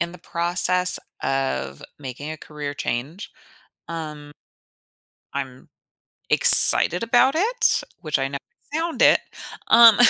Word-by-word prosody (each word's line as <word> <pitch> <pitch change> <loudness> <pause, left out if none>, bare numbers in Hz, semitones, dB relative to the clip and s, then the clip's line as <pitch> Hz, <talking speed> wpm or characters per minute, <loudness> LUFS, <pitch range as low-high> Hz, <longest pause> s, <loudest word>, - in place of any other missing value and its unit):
in 170 +1 -3
the 180 - -13
process 180 +2 +1 0.2
of 135 - -3 0.2
making 140 +2 -8
a 155 - -7
career 150 -1 -8
change, 145 - -5 0.6
um, 150 -3 -8 1.0
I'm 130 -2 -7 0.6
excited 175 - +6
about 255 +4 +2
it, 450 +6 0 0.2
which 155 -3 -2
I 135 0 -2
ne 140 - -6 0.4
found 325 +1 -2
it, - - +5 0.5
um 230 -1 +7
160 Hz, 115 wpm, -21 LUFS, 140-200 Hz, 1.0 s, um